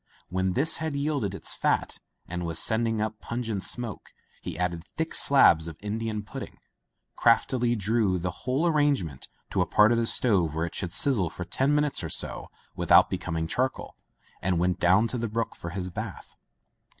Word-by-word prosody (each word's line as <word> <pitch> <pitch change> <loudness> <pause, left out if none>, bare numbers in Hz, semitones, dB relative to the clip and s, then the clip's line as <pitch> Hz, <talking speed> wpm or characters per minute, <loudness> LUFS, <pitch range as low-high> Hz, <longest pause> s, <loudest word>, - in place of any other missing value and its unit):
When 95 0 0
this 150 - +2
had 160 -2 -3
yielded 140 -9 -1
its - - -5
fat - - 0 0.3
and 90 0 -4
was 85 -1 -2
sending 115 +2 +1
up 110 0 -2
pungent 115 -5 -3
smoke, 120 0 -6 0.3
he - - -6
added 85 -2 -2
thick 160 0 -2
slabs 85 - +5
of 80 -2 -8
Indi 110 +2 -3
an 105 -1 -3
pudding, - - -8 0.6
craftily 120 +1 +3
drew 105 -2 +1
the 90 +1 -2
whole 130 - -1
arrange 145 - +3
ment 70 -5 -7 0.2
to - - +1
a - - +1
part 105 +2 +5
of 115 - +3
the 115 - +1
stove 90 - +2
where 80 +1 0
it 85 - -7
should 90 -3 -3
sizzle 105 -6 +1
for 90 +2 -7
ten 135 +10 +1
minutes 150 -8 +1
or 80 - -4
so - - -2 0.3
without - - +5
becom 80 - -3
ing 80 - -1
charcoal, 130 +10 -2 0.5
and 90 -1 +1
went 90 +1 +1
down 95 +6 +4
to 125 - -3
the 115 - -1
brook 115 +2 -2
for 85 - -7
his 90 +1 -4
bath. - - -7
105 Hz, 190 wpm, -27 LUFS, 90-125 Hz, 0.6 s, slabs